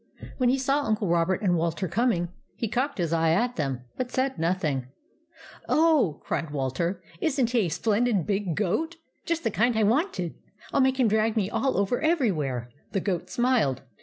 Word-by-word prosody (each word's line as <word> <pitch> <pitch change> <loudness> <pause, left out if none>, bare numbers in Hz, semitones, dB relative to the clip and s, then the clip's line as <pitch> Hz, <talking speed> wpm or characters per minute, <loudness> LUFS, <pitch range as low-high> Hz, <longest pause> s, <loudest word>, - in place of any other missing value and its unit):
When 250 -2 +3
he 260 - +3
saw 275 +2 +1
Uncle 215 -3 0
Robert 170 +3 +1
and 180 -3 +3
Walter 170 +2 -1
coming, 185 -3 +1 0.3
he 230 - -2
cocked 260 +6 -1
his 170 -3 -1
eye 165 0 +3
at 240 +7 +1
them, 135 -5 -2 0.2
but 255 -1 -2
said 260 -6 -1
nothing. 160 -7 0 0.4
" 325 -1 -19
Oh," 305 - +3
cried 165 - -2
Walter, 145 +6 -2
" 165 - -23
is 280 -3 0
n't 240 -2 +2
he 230 -7 +2
a - - -3
splen 215 +7 +1
did 205 -9 +1
big 195 -5 -1
goat! 215 - -1 0.3
Just 335 -1 -1
the 225 - 0
kind 230 +3 +2
I 220 - +3
wanted. 215 - +1 0.4
I - - +2
'11 275 - +5
make 265 0 +2
him 250 - +5
drag 220 +1 +1
me 205 -2 0
all 270 -1 0
over 200 +5 +1
every 310 -8 +3
where! 130 -7 -3
" - - -38
The 195 - +2
goat 185 -3 -2
smiled. 240 - +1
210 Hz, 210 wpm, -26 LUFS, 170-255 Hz, 0.4 s, 11